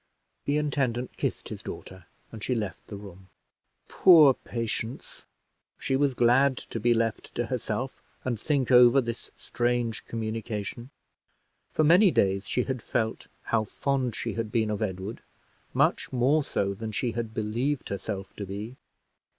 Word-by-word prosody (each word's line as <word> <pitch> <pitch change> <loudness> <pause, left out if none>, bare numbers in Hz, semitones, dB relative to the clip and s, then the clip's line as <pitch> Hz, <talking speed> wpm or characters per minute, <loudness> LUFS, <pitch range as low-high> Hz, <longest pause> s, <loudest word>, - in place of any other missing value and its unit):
The 145 +1 +1
intendant 130 -5 -1
kissed - - -3
his - - -7
daughter, 95 -2 -9 0.3
and 110 -2 -8
she 125 - 0
left 105 -5 -4
the 105 - -7
room. 95 -2 -11 0.6
Poor 160 -7 +7
Patience! 115 0 -5 0.5
she 135 - -1
was 135 -1 +2
glad 125 +3 +4
to 115 - -6
be 120 +3 +2
left 115 -2 -1
to 120 - 0
herself, 125 +1 -3 0.2
and 120 -4 -1
think 135 -1 0
over 125 +1 +8
this 120 -2 -4
strange 120 -2 -1
communication. 110 +1 -4 0.8
For 155 - +2
many 180 +6 +7
days 100 - +1
she 125 - +1
had 130 -2 -3
felt 110 0 -2 0.2
how 110 -2 +1
fond 130 0 -1
she - - -3
had 115 -2 -3
been 110 -2 +1
of 105 - -3
Edward, 95 +1 -4 0.5
much - - +1
more 135 +5 +3
so 100 -6 -1
than 110 +2 -5
she 120 +3 -1
had 115 0 -4
believed 120 +6 -1
herself 100 0 -5
to 100 - -4
be. 105 +6 -6
115 Hz, 150 wpm, -27 LUFS, 105-130 Hz, 0.8 s, over